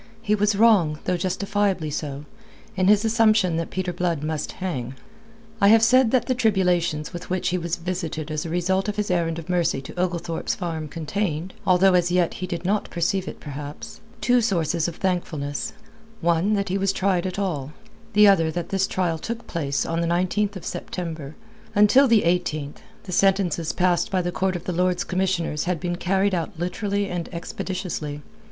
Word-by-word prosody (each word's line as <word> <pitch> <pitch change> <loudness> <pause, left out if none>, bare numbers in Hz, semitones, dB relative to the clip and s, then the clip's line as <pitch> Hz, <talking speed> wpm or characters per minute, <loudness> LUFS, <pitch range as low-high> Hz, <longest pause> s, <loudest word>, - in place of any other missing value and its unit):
He 210 - +1
was 210 0 +2
wrong 200 -8 +4
though 180 - 0
justifiably 190 -2 -1
so 145 -1 -4 0.5
in 185 -1 +2
his 210 +2 +5
assumption 215 -6 +3
that 165 - -2
Peter 185 -1 -3
Blood 170 -5 -1
must 155 -1 -3
hang. 135 -9 -4 0.7
I 200 - +6
have 225 +2 +6
said 255 +1 +5
that 245 0 +2
the 255 - +1
tribulations 180 -9 +1
with 175 - -7
which 185 0 0
he 180 - 0
was 170 0 -2
visited 165 -3 -4
as 155 0 -2
a 165 - -5
result 190 +4 0
of 205 - -2
his 210 -2 -1
errand 165 -2 0
of 165 - -7
mercy 175 -6 +1
to 175 - -8
Oglethorpe's 175 -2 -1
Farm 165 -4 -4
contained 165 +2 -3
although 185 +1 +5
as 175 -1 +3
yet 180 -2 +2
he 185 - -2
did 175 0 -5
not 205 +2 0
perceive 185 +2 -1
it, - - -7
perhaps 145 0 -8 0.2
two 245 0 +4
sources 170 -6 0
of 170 - -5
thankfulness: 155 -7 -2 0.5
one 170 +5 +2
that 200 -1 -1
he 195 +2 0
was 195 0 +2
tried 190 -2 0
at 185 - -5
all; 155 -8 -2 0.4
the 210 0 +7
other 165 -5 +4
that 170 +1 -4
his 195 -1 +1
trial 170 -3 -1
took 230 +6 -5
place 140 -5 -2
on 165 0 -1
the 170 - 0
19th 185 +4 0
of 185 - -8
September. 160 -5 -5 0.4
Until 210 +7 +6
the 230 -3 +4
18th, 160 -4 -1 0.3
the 185 - -8
sentences 185 -4 +2
passed 180 +3 +1
by 185 -3 0
the 175 - -1
court 190 +1 0
of 175 - -5
the 180 - -3
Lords 180 0 +1
Commissioners 180 -5 -1
had 180 -2 -1
been 175 +1 -2
carried 195 +2 +1
out 170 +1 -2
literally 200 +4 -1
and 175 -3 -4
expeditiously. 170 -4 -4
180 Hz, 185 wpm, -24 LUFS, 165-195 Hz, 0.7 s, the